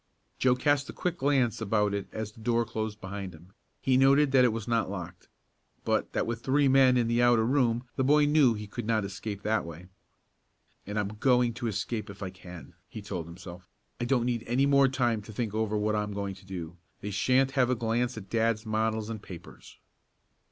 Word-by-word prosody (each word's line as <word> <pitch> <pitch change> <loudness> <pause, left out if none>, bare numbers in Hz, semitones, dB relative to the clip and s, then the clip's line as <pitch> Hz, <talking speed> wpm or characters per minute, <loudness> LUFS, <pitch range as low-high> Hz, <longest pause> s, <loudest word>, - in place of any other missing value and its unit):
Joe 125 -1 +4
cast 145 +2 +1
a - - -6
quick 180 -1 -3
glance 135 -5 +1
about 105 -1 +1
it 100 -1 -3
as 110 -1 -5
the 110 - -18
door 115 +1 +1
closed 110 -1 -4
behind 95 -2 -6
him. 90 +4 -18 0.3
He 130 -1 +2
noted 135 +2 +4
that 130 -2 +5
it 125 - +4
was 110 0 -5
not 115 -4 +1
locked, 90 -2 -7 0.6
but - - 0
that - - 0
with 115 0 -4
three 140 +2 +2
men 130 -1 +5
in 120 -2 +2
the 115 +1 +2
outer 120 -2 +4
room 120 -2 +1
the 130 - +1
boy 150 +2 +4
knew 145 -5 +4
he 105 0 -6
could 105 +2 -6
not 110 -3 +1
escape 100 +1 -6
that 110 +1 +1
way. 85 +2 -10 1.0
"And 105 +1 -4
I'm 105 -1 0
going 120 +2 +2
to 120 0 -4
escape 110 +1 -3
if 100 0 -8
I 95 - -4
can," 90 -2 -12 0.2
he 110 -2 -8
told 90 -5 -5
himself. 90 +1 -11 0.3
"I 120 - -1
don't 120 -1 +1
need 120 -2 -1
any 125 +4 +2
more 140 -1 +5
time 120 -4 0
to 105 - -11
think 110 -1 -3
over 110 -1 0
what 105 +1 0
I'm 105 -1 -2
going 100 -1 -3
to 95 0 -16
do. 85 -3 -7 0.2
They 105 - -5
shan't 130 +7 +2
have 130 -3 +2
a 130 - +2
glance 120 +1 -1
at 100 -2 -8
dad's 115 +1 0
models 110 0 -1
and 110 -2 -6
papers." 90 -4 -12
110 Hz, 215 wpm, -28 LUFS, 100-125 Hz, 1.0 s, that